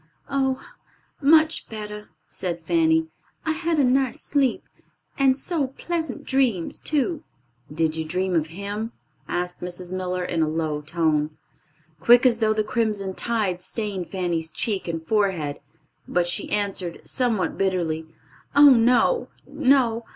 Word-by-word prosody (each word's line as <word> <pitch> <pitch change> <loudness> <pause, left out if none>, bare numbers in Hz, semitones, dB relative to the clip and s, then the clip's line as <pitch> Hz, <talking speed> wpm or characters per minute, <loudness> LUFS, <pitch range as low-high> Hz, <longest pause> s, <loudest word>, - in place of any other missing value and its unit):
"Oh, 265 -1 +1 0.6
much 315 +2 +4
better," 210 -1 -7 0.2
said 170 -3 -4
Fanny. 320 - +2 0.4
"I 315 - +1
had 330 +1 -1
a 290 - +4
nice 260 0 +2
sleep, 275 -4 +1 0.5
and 265 -1 +3
so 305 -2 -1
pleasant 320 +1 -4
dreams, 250 -10 +1
too." 305 +1 -1 0.5
"Did 160 0 0
you 160 - -2
dream 180 +4 -1
of 160 -1 +1
him?" 205 +6 -5 0.3
asked 180 0 -3
Mrs. 180 +1 -5
Miller, 180 -1 -2
in 170 -2 -1
a 160 - +2
low 155 -1 -2
tone. 155 -1 0 0.6
Quick 240 +8 +6
as 235 -3 +4
thought 215 -1 +2
the 215 - +1
crimson 210 -4 -1
tide 205 -5 -1
stained 195 -2 -3
Fanny's 175 -4 -2
cheek 200 +3 0
and 165 -1 -4
forehead, 185 -8 0 0.5
but 175 -1 +1
she 175 - -1
answered, 195 -4 -2
somewhat 235 -7 0
bitterly, 170 -5 -1 0.5
"Oh, 285 0 +9
no, 250 - +4 0.2
no! 260 -5 +2
210 Hz, 135 wpm, -24 LUFS, 175-265 Hz, 0.6 s, Oh